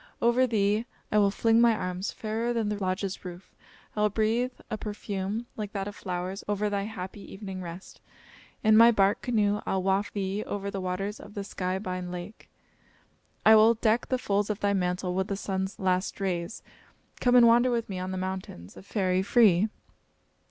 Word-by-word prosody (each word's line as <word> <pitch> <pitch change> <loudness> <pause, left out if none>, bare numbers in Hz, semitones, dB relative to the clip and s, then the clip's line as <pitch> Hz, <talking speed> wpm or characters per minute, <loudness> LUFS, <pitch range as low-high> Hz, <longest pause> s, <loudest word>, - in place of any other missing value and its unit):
Over 240 +2 +3
thee 215 0 +1 0.2
I 210 - +4
will 200 -1 +4
fling 225 +3 +3
my 235 -1 +5
arms, 185 -1 -3
fairer 225 +2 -2
than 225 -3 0
the 210 -1 -3
lodge's 185 +1 -2
roof. 180 0 -10 0.4
I 210 - -1
will 210 - +4
breathe 225 +4 0
a 215 - -3
perfume 205 +1 -4
like 210 -2 -5
that 195 -1 -3
of 205 - -7
flowers 185 0 -4
over 205 0 0
thy 200 -1 -1
happy 200 -2 -7
evening 195 -2 -7
rest. 175 +2 -9 0.6
In 215 -1 +5
my 230 +1 +9
bark 200 -3 +3
canoe 210 -4 +1
I'll 190 -1 -1
waft 195 +2 0
thee 200 +1 -2
over 200 0 -3
the 195 - -4
waters 195 +3 -3
of 205 - -12
the 200 - -3
sky 185 -1 -3
bine 185 -2 -4
lake. 180 +4 -8 1.0
I 220 - +9
will 220 +2 +6
deck 225 +1 +1
the 255 - +1
folds 205 -3 0
of 210 -1 -2
thy 205 0 +1
mantle 180 -1 -1
with 190 +1 -1
the 200 - -2
sun's 190 0 -3
last 185 +1 0
rays. 180 -1 -3 0.6
Come 245 0 +3
and 245 -1 +8
wander 240 +2 +5
with 235 -2 -1
me 190 -2 -5
on 185 0 -4
the 185 - -3
mountains, 185 - -6
a - - -10
fairy 190 -2 0
free!" 205 -1 +4
200 Hz, 190 wpm, -28 LUFS, 190-220 Hz, 1.0 s, my